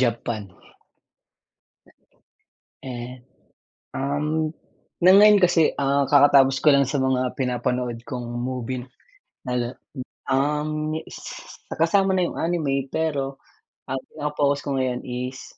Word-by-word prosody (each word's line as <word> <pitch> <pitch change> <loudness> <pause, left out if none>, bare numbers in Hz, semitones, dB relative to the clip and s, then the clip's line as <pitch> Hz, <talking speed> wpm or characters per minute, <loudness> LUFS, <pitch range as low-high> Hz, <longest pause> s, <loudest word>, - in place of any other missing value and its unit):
Japan. 115 -3 -1 2.4
Eh, 125 -1 -7 0.8
um, 150 +3 -1 0.5
ng 185 +2 +7
ngayon 210 -1 +7
kasi, 175 -3 +4
ah, 140 0 +2
kakatapos 140 -1 +5
ko - - -2
lang 140 - +4
sa 140 +2 -2
mga 130 -1 +1
pinapanood 125 -1 -2
kong 125 -2 -6
movie 125 0 -3 0.7
na 125 -1 -1 0.5
um, 150 +3 0
s - - -10
kasama 195 +4 +2
na 185 -2 +2
yung - - -6
anime, 140 -6 -1
pero 140 -4 -2 0.8
pinaka 150 -1 -4
focus 145 0 +2
ko 140 -1 -3
ngayon 125 -1 -1
is 125 +1 -6
135 Hz, 110 wpm, -23 LUFS, 125-155 Hz, 2.4 s, ng